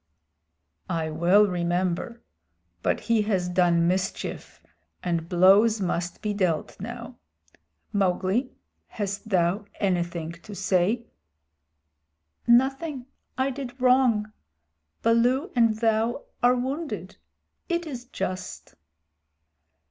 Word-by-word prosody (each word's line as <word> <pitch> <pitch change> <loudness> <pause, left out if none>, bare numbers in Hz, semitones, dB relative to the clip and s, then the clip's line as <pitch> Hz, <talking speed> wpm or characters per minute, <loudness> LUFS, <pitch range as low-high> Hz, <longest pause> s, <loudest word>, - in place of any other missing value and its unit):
"I 165 -3 -1
will 175 +6 +5
remember. 180 +4 -1 0.6
But - - 0
he 230 -2 +2
has 185 -4 +1
done 175 -2 +3
mischief, 185 +1 -3 0.4
and 170 -2 -1
blows 200 +5 +5
must 175 -2 -2
be 210 -1 0
dealt 180 -6 -1
now. - - -7 0.7
Mowgli, 195 +5 +1 0.4
hast 205 0 -4
thou 185 +1 +1
anything 175 -4 -1
to 175 +5 -11
say?" 195 +5 +1 1.4
"Nothing. 265 +3 +2 0.3
I 265 +1 +1
did 260 -1 -7
wrong. 250 -4 +3 0.7
Baloo 245 - +2
and 230 -2 +4
thou 225 +3 +1 0.2
are 245 +1 +5
wounded. 275 +6 -4 0.5
It 345 0 0
is 250 -6 -7
just." 185 -5 -5
205 Hz, 95 wpm, -26 LUFS, 180-245 Hz, 1.4 s, will